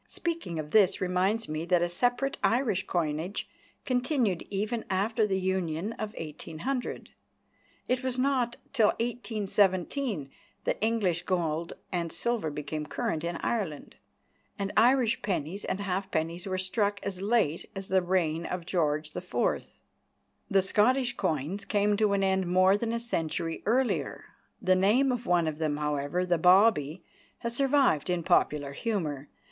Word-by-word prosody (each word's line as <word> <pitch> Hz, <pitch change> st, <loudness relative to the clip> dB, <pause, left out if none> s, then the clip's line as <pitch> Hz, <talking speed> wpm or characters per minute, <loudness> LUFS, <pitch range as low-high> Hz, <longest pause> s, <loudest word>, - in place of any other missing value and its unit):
Speaking 335 Hz, -, -3 dB
of 150 Hz, -1 st, -5 dB
this 205 Hz, -4 st, +4 dB
reminds 190 Hz, +5 st, +1 dB
me 155 Hz, +1 st, -3 dB
that 175 Hz, -1 st, +3 dB
a -, -, +2 dB
separate 245 Hz, +9 st, 0 dB
Irish 230 Hz, -6 st, +1 dB
coinage 165 Hz, +2 st, -2 dB, 0.4 s
continued 250 Hz, -, +1 dB
even 215 Hz, +4 st, -2 dB
after 210 Hz, +3 st, +1 dB
the 190 Hz, -1 st, 0 dB
Union 185 Hz, +1 st, -1 dB
of 215 Hz, -1 st, -6 dB
1800. 165 Hz, -, -5 dB, 0.8 s
It 255 Hz, 0 st, +1 dB
was 260 Hz, -1 st, -1 dB
not 255 Hz, -2 st, +1 dB, 0.2 s
till 225 Hz, -5 st, +5 dB
1817 210 Hz, -, 0 dB, 0.3 s
that -, -, -1 dB
English 210 Hz, -6 st, +1 dB
gold 170 Hz, -2 st, -1 dB, 0.2 s
and 170 Hz, -3 st, -2 dB
silver 235 Hz, -9 st, -1 dB
became 150 Hz, +1 st, -4 dB
current 155 Hz, 0 st, -2 dB
in 170 Hz, 0 st, -2 dB
Ireland, 190 Hz, -11 st, -3 dB, 0.6 s
and 200 Hz, 0 st, -3 dB
Irish 245 Hz, 0 st, +4 dB
pennies 180 Hz, 0 st, -2 dB
and 190 Hz, -, -2 dB
halfpennies 180 Hz, -3 st, -2 dB
were 185 Hz, -1 st, -1 dB
struck 200 Hz, +2 st, 0 dB
as 190 Hz, -2 st, -4 dB
late 200 Hz, -7 st, +1 dB
as 195 Hz, 0 st, -5 dB
the 190 Hz, 0 st, +3 dB
reign 170 Hz, -3 st, 0 dB
of 180 Hz, -2 st, -4 dB
George 155 Hz, -4 st, 0 dB
IV. -, -, -2 dB, 0.7 s
The 195 Hz, -3 st, +3 dB
Scottish 245 Hz, +6 st, +2 dB
coins 170 Hz, +2 st, -2 dB
came 205 Hz, 0 st, +2 dB
to 210 Hz, -1 st, +2 dB
an 195 Hz, -1 st, +1 dB
end 190 Hz, -1 st, +1 dB
more 185 Hz, +2 st, +5 dB
than 225 Hz, +2 st, -1 dB
a 235 Hz, -, -1 dB
century 165 Hz, -7 st, -2 dB
earlier. 250 Hz, +3 st, 0 dB, 0.3 s
The 185 Hz, 0 st, +3 dB
name 220 Hz, +9 st, +3 dB
of 245 Hz, -1 st, -3 dB
one 175 Hz, -2 st, +3 dB
of 155 Hz, 0 st, -3 dB
them, 155 Hz, -2 st, 0 dB
however, 150 Hz, +4 st, -1 dB
the 175 Hz, -2 st, +1 dB
"bawbee," 180 Hz, -3 st, +4 dB, 0.4 s
has 235 Hz, 0 st, -3 dB
survived 270 Hz, -, +3 dB
in 175 Hz, -1 st, 0 dB
popular 145 Hz, -2 st, +2 dB
humour. 150 Hz, -, -3 dB
190 Hz, 145 wpm, -29 LUFS, 165-225 Hz, 0.8 s, till